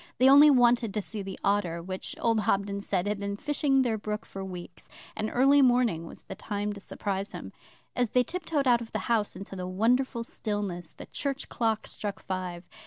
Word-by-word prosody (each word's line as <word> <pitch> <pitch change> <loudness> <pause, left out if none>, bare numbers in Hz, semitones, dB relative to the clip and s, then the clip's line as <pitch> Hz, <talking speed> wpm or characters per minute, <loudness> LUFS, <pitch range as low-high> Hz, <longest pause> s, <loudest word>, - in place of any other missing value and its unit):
They 255 - +5
only 285 +3 +9
wanted 240 -5 +4
to 210 - +1
see 215 0 -5
the 195 -1 -6
otter 195 -4 +1
which, 185 +2 -5
old 230 -1 +2
Hobden 200 -1 0
said, 195 -2 -1
had 210 -1 -1
been 200 0 -3
fishing 275 0 +2
their 225 -3 0
brook 210 +1 -4
for 195 - -7
weeks; 180 -2 -9 0.3
and 215 - -2
early 275 +3 +5
morning 245 -10 +3
was - - -12
the - - -7
time 205 0 -3
to 200 - -9
surprise 195 0 -4
him. - - -8 0.4
As 245 -2 +1
they 250 +2 +3
tiptoed 320 -1 -2
out 240 -1 +5
of 230 - -9
the - - +1 0.2
house 215 -3 0
into 195 0 -8
the 180 -1 -4
wonderful 235 +5 +1
stillness, 205 -7 -4
the - - -10
church 280 -1 -4
clock 225 -2 0
struck 205 -2 -5
five. 185 -2 -4
210 Hz, 200 wpm, -28 LUFS, 195-245 Hz, 0.4 s, only